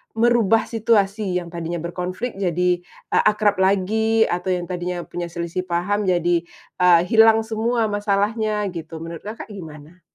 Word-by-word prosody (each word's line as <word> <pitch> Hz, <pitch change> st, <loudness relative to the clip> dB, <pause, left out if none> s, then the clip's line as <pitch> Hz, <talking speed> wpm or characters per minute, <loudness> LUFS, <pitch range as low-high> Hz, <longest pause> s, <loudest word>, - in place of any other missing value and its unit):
merubah 225 Hz, -2 st, +3 dB
situasi 205 Hz, -4 st, +1 dB
yang 175 Hz, -, -8 dB
tadinya 170 Hz, 0 st, -4 dB
berkonflik 185 Hz, +6 st, -4 dB
jadi, 180 Hz, -1 st, 0 dB
eee, -, -, -2 dB
akrab 210 Hz, -1 st, +1 dB
lagi 220 Hz, +4 st, +2 dB
atau 180 Hz, +2 st, -2 dB
yang 175 Hz, -1 st, -2 dB
tadinya 180 Hz, -1 st, -4 dB
punya 175 Hz, -1 st, -5 dB
selisih 170 Hz, +2 st, -3 dB
paham 185 Hz, +4 st, 0 dB
jadi, 175 Hz, -1 st, +2 dB, 0.4 s
eee, 180 Hz, -2 st, +6 dB
hilang 225 Hz, +1 st, +5 dB
semua 225 Hz, +1 st, 0 dB
masalahnya 210 Hz, +1 st, 0 dB
gitu, 165 Hz, -1 st, -7 dB
menurut 165 Hz, -1 st, -8 dB
Kakak 215 Hz, +1 st, -8 dB
gimana? 160 Hz, -2 st, -11 dB
185 Hz, 140 wpm, -21 LUFS, 175-215 Hz, 0.4 s, eee